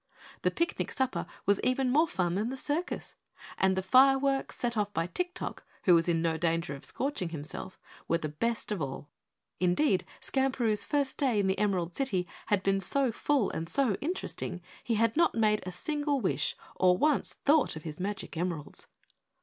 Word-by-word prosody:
The - - +3
picnic 340 +1 -1
supper 260 -1 -1 0.2
was 200 0 +3
even 255 0 +2
more 310 +5 +4
fun 175 - -1
than 210 +5 0
the 265 - -4
circus, 310 +6 -3 0.5
and 190 0 +3
the 190 - -1
fireworks, 270 +5 +4
set 240 -1 -1
off 205 -1 0
by 165 -3 0
Tik 360 - -3
Tok, - - -5 0.2
who 180 - +6
was 165 0 +4
in 165 -1 +1
no 165 -1 +1
danger 165 -3 0
of 140 - -9
scorching 270 -10 -2
himself, 160 +4 -7 0.3
the 165 -2 +1
best 220 +10 -2
of 200 -5 -1
all. 135 +1 -5 0.5
Indeed, 185 - +2 0.2
Skamperoo's 260 -5 +1
first 285 -3 0
day 255 -7 +2
in 200 - +2
the 190 0 +1
Emerald 185 -5 0
City 190 -10 0 0.2
had 205 -3 +2
been 195 0 +2
so 260 +7 +1
full 265 -1 +1
and 165 0 -4
so 270 -6 +2
interesting 300 - -3 0.2
he 230 - 0
had 225 +1 +2
not 335 +1 +3
made 215 -2 +3
a - - -3
single 290 - -1
wish 150 - 0 0.2
or 180 -1 +4
once 300 +3 +2
thought 290 - +4
of 155 - -8
his 155 0 -7
magic 195 0 -4
emeralds. 165 -3 -4
210 Hz, 180 wpm, -30 LUFS, 175-270 Hz, 0.5 s, who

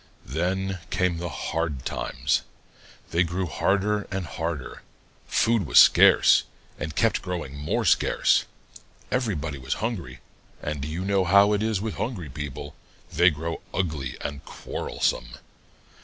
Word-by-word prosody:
Then 95 +7 -2
came 90 -2 0
hard 80 -4 -3
times. - - -1 0.7
They 85 - +2
grew 90 +2 0
harder 100 +6 0
and 95 -1 -3
harder. 80 -4 -5 0.5
Food 110 -7 +2
was - - +2
scarce - - +7 0.4
and 80 -1 -5
kept - - +2
growing 85 -7 -5
more 75 +1 -1
scarce. - - +3 0.7
Everybody 85 - -1
was 65 +2 -2
hungry, 110 -5 -4 0.4
and 75 -2 -4
you 80 +5 -4
know 100 -1 +2
how 100 +3 +5
it 105 - +1
is 110 -3 0
with 110 0 -4
hungry 100 - -3
people 75 0 -6 0.4
they 90 +3 +6
grow 80 +1 -4
ugly 75 -9 -2
and 70 0 -5
quarrelsome. - - -3
85 Hz, 125 wpm, -25 LUFS, 75-95 Hz, 0.7 s, scarce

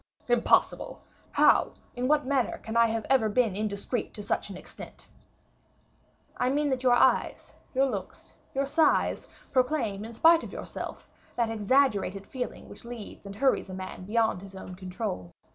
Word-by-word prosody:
"Impossible! 240 -1 +2 0.3
How, - - +4 0.2
in 250 +1 -1
what 295 0 +3
manner 265 -3 0
can 220 0 -7
I 230 0 +6
have 225 -1 -2
ever 255 -5 +3
been 220 -2 +2
indiscreet 210 +3 -3
to 210 - -6
such - - -1
an 190 - -7
extent?" - - -10 1.3
"I 250 - +1
mean, 290 +1 +1
that 260 -1 0
your 255 -1 +4
eyes, 245 - +2 0.2
your 270 +1 +4
looks, 265 - -5 0.2
your 275 +1 +1
sighs, 305 +2 +2 0.2
proclaim, 250 -6 +1
in 225 +1 -8
spite 325 +7 +6
of - - -7
yourself, - - -7 0.3
that 230 -2 0
exaggerated 210 -3 +1
feeling 255 -2 -6
which - - -11
leads 235 -4 -9
and 200 - -8
hurries 265 -4 +1
a 185 - -6
man 185 -1 -7
beyond 220 -2 +1
his 195 0 -11
own 190 -1 -8
control. 185 - -5
230 Hz, 160 wpm, -28 LUFS, 200-260 Hz, 1.3 s, I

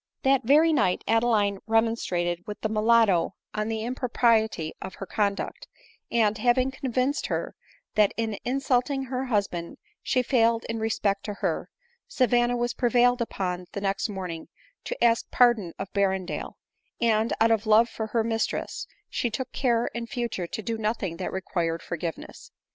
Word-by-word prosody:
That 270 0 +4
very 310 +5 +5
night 185 -11 +1
Adeline 220 -3 +2
remonstrated 185 -6 0
with 210 - -7
the 220 - -1
mulatto 215 -4 +3 0.2
on 215 0 -2
the 220 -1 -2
impropriety 230 -8 +1
of 190 - -7
her 195 - -7
conduct, 200 -1 -2 0.4
and, 220 -2 +2
having 255 +3 +2
convinced 265 +1 -1
her - - -2 0.4
that 210 -2 +4
in 220 -3 -2
insulting 270 +1 0
her 260 0 -3
husband 200 -8 -2 0.2
she 255 -2 +1
failed 230 -2 +2
in 225 0 -3
respect 215 -3 0
to 205 - -4
her, - - -2 0.4
Savanna 245 - +2
was 240 0 -1
prevailed 245 0 +3
upon 180 -5 -3
the 200 - -4
next 195 +2 -1
morning 180 -5 -5 0.4
to - - -3
ask 230 -1 +3
pardon 235 -8 +3
of 195 - -6
Berrendale; 190 -2 -1 0.5
and, 225 -1 +2
out 225 +1 +4
of 220 -1 +1
love 220 +2 +6
for 220 -2 -5
her 225 +1 0
mis 225 0 0
tress, - - -5 0.2
she 240 - -1
took 255 +3 -4
care 240 -3 +1
in 235 0 -4
future 235 -8 -3
to 220 - -5
do 225 +1 -3
nothing 210 -6 -2
that - - -4
required 170 -3 -2
forgiveness. 170 -1 -6
225 Hz, 160 wpm, -26 LUFS, 200-240 Hz, 0.5 s, love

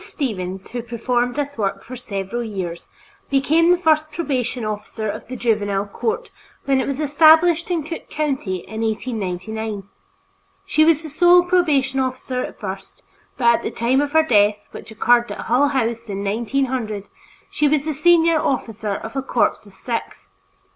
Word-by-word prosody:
Stevens, 190 - -4
who 240 0 -3
performed 240 +1 -1
this 285 -3 -3
work 195 -2 -1
for 255 - -9
several 220 0 -4
years, 185 -6 -5 0.4
became 310 +5 +3
the 355 - +5
first 310 -3 +2
probation 255 -8 -2
officer 215 +1 -4
of 205 - -5
the 255 - -6
Juvenile 205 -4 0
Court 450 - -3 0.3
when 270 -1 +2
it - - -3
was 275 0 -3
established 320 +3 +5
in 340 -3 0
Cook 330 +3 -7
County 265 - -2
in 220 0 -5
1899. 220 -2 -3 0.8
She 310 - +3
was 320 0 +3
the 315 - -7
sole 350 +3 +6
probation 300 -7 +2
officer 255 -1 -2
at - - -8
first, 195 -2 -7 0.3
but 235 -2 +4
at - - -9
the - - -3
time 250 +4 +1
of 290 0 -3
her 320 0 +5
death, 205 -6 +2
which - - -10
occurred 240 +2 +2
at - - -5
Hull 255 +5 +2
House 235 -4 -2
in 200 0 -3
1900, 230 0 -1 0.5
she 300 - +2
was 290 0 +1
the 315 - -1
senior 330 +1 +4
officer 220 -7 -2
of 225 +5 -7
a 270 - 0
corps 245 -4 0
of 200 - -16
six. 230 +3 -5
250 Hz, 170 wpm, -21 LUFS, 215-300 Hz, 0.8 s, sole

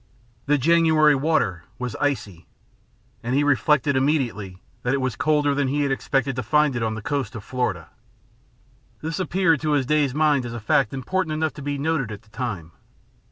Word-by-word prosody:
The 145 +1 +4
January 160 0 +4
water 135 - 0
was 125 -2 -4
icy, 105 - -2 0.7
and 120 +2 -2
he 145 - +3
reflected 145 0 +2
immediately 125 -9 0 0.2
that 125 +2 0
it - - -1
was 130 -4 -2
colder 145 0 +2
than 140 -1 0
he 145 +3 0
had 140 - 0
expected 135 -1 0
to - - 0
find 150 -1 +2
it 120 - -2
on 110 -1 -1
the 110 - -7
coast 140 -5 -2
of 110 - -7
Florida. 125 +1 -2 1.2
This 160 +2 -3
appeared 175 -4 +2
to 155 -1 0
his 140 -3 +2
dazed 145 -1 +1
mind 150 -3 +3
as 120 -1 -6
a 120 - -5
fact 110 +2 +2
important 160 +5 -2
enough 155 -2 -1
to 150 - -10
be 145 0 -3
noted 140 -5 -1
at 105 +1 -8
the 110 - -25
time. 105 -8 -5
140 Hz, 190 wpm, -23 LUFS, 120-150 Hz, 1.2 s, The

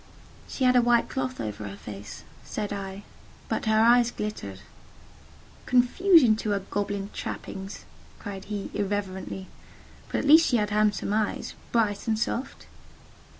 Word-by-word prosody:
"She 265 - -3
had 250 0 +5
a 245 - +7
white 240 0 +3
cloth 255 -1 -3
over 105 -1 -4
her 100 0 -8
face," 100 -1 -9 0.2
said 210 -1 -4
I, 195 0 -6 0.4
"but - - -2
her 220 0 +4
eyes 240 +1 +5
glittered." 155 - -5 1.1
"Confusion 255 - +5
to 215 - -3
her 200 -1 +1
goblin 200 +1 -3
trappings!" 195 +1 -6 0.3
cried 195 -1 -7
he, 205 -1 -5
irreverently: 190 -2 -3 0.7
"but - - 0
at - - -1
least 315 +3 +7
she 245 - +3
had 210 -2 0
handsome 210 -1 +1
eyes—bright 215 0 -1
and 220 -1 +2
soft." 235 +3 -3
210 Hz, 140 wpm, -27 LUFS, 195-240 Hz, 1.1 s, a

